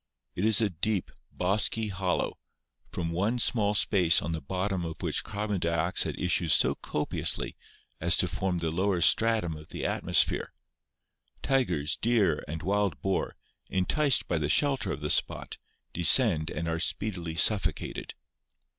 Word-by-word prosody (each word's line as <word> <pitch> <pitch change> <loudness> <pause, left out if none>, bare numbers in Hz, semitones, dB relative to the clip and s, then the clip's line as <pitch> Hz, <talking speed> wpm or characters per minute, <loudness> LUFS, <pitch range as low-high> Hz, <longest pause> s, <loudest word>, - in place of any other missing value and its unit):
It 95 - -2
is 110 0 +4
a 105 -3 +1
deep, 95 +3 -2 0.2
bosky 105 +4 +1
hollow, 95 -2 -2 0.5
from 85 -2 -3
one 100 +8 0
small 105 -4 +2
space 90 -4 +3
on 85 - -4
the 80 -1 -3
bottom 95 +4 -2
of 80 -2 -6
which - - -1
carbon 105 -1 -3
dioxide 85 +1 -1
issues 90 -2 +2
so - - +3
copiously 75 - -3 0.4
as - - +3
to - - +3
form 95 -2 -2
the 80 -2 -2
lower 95 +2 0
stratum 110 -5 +2
of 75 0 -11
the - - -5
atmosphere. - - +1 0.9
Tigers, 85 - +1
deer, 105 -10 +1
and 80 +1 -6
wild 100 -5 0
boar, 95 -1 -1 0.3
enticed 135 +9 +2
by 85 - 0
the 75 -1 -1
shelter 135 - +1
of 75 - -5
the 75 - -1
spot, - - -1 0.3
descend 85 - +4
and 80 +2 -4
are 80 0 -1
speedily 90 -3 -2
suffocated. 100 +4 -1
90 Hz, 145 wpm, -28 LUFS, 80-105 Hz, 0.9 s, is